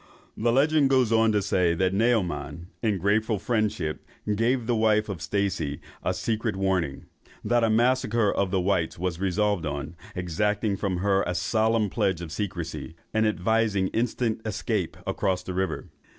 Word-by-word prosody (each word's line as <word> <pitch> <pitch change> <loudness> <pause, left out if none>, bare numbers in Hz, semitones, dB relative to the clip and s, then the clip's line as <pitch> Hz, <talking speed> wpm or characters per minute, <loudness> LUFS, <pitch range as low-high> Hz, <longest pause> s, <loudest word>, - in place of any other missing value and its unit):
The 115 +2 +1
legend 145 +2 +4
goes 130 -4 +3
on 115 -1 +4
to 105 -2 +1
say, 90 -4 +2
that 95 +2 +1
Naoman, 90 -7 0
in 110 -4 +1
grateful 105 +4 +1
friendship, 100 -7 -1 0.3
gave 120 +3 +1
the 120 0 +1
wife 110 -1 +2
of 95 -4 -5
Stacey 90 -8 -1 0.2
a - - 0
secret 110 -1 -1
warning, 95 -7 -1 0.4
that 120 -1 +2
a 115 - +3
massacre 115 -2 +2
of 100 - 0
the 95 0 +1
whites 90 -3 0
was 90 -1 -2
resolved 95 -2 0
on, 75 +2 -4 0.2
exacting 100 +4 0
from 95 -2 -2
her 100 -1 +3
a 90 - -1
solemn 110 +5 +2
pledge 100 -6 0
of 85 -3 -7
secrecy, 85 -6 -4 0.2
and 110 0 +3
advising 105 0 +1
instant 115 -1 -1
escape 110 -3 -2
across 95 -2 -1
the 95 - -5
river. 95 -2 -2
100 Hz, 160 wpm, -26 LUFS, 90-110 Hz, 0.4 s, legend